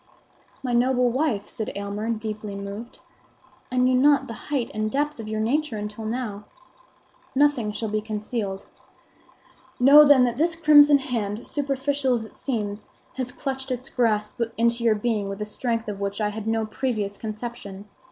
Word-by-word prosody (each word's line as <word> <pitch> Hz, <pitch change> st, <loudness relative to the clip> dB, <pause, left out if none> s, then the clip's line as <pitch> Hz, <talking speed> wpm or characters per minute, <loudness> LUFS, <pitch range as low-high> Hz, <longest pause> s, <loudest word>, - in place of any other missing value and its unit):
"My 250 Hz, -2 st, -1 dB
noble 250 Hz, 0 st, +3 dB
wife," 250 Hz, -6 st, 0 dB
said 220 Hz, -, -5 dB
Aylmer, 200 Hz, +2 st, -4 dB
deeply 215 Hz, -2 st, -4 dB
moved, 200 Hz, +4 st, -7 dB, 0.7 s
"I 255 Hz, -, -2 dB
knew 250 Hz, +1 st, +4 dB
not 280 Hz, +3 st, +4 dB
the 230 Hz, -, -7 dB, 0.2 s
height 275 Hz, -5 st, -1 dB
and 215 Hz, 0 st, -1 dB
depth 295 Hz, +3 st, -1 dB
of 220 Hz, -, -6 dB
your 215 Hz, 0 st, -2 dB
nature 250 Hz, +2 st, 0 dB
until 210 Hz, +1 st, -6 dB
now. 215 Hz, -3 st, -4 dB, 0.9 s
Nothing 265 Hz, -6 st, +3 dB
shall 220 Hz, +2 st, -3 dB
be 215 Hz, 0 st, -1 dB
concealed. 210 Hz, -2 st, -4 dB, 1.1 s
Know, 280 Hz, +4 st, +9 dB
then, 285 Hz, -3 st, +6 dB
that 240 Hz, +1 st, 0 dB
this 330 Hz, +1 st, +2 dB
crimson 295 Hz, -3 st, +7 dB
hand, 230 Hz, -5 st, -3 dB
superficial 275 Hz, -2 st, 0 dB
as 225 Hz, -2 st, -3 dB
it -, -, -14 dB
seems, 210 Hz, -5 st, -4 dB, 0.3 s
has 255 Hz, -1 st, -3 dB
clutched 265 Hz, 0 st, -5 dB
its 255 Hz, +1 st, -4 dB
grasp 215 Hz, -2 st, 0 dB, 0.2 s
into 235 Hz, +1 st, +2 dB
your 225 Hz, -2 st, +4 dB
being 210 Hz, -2 st, -1 dB
with 195 Hz, +1 st, -5 dB
a 210 Hz, -, -2 dB
strength 230 Hz, +1 st, -2 dB
of 205 Hz, -2 st, -4 dB
which 200 Hz, +1 st, -3 dB
I 210 Hz, -1 st, +1 dB
had 215 Hz, +1 st, -6 dB
no 225 Hz, 0 st, +1 dB
previous 215 Hz, -3 st, -2 dB
conception. 215 Hz, -2 st, -7 dB
230 Hz, 165 wpm, -24 LUFS, 210-260 Hz, 1.1 s, Know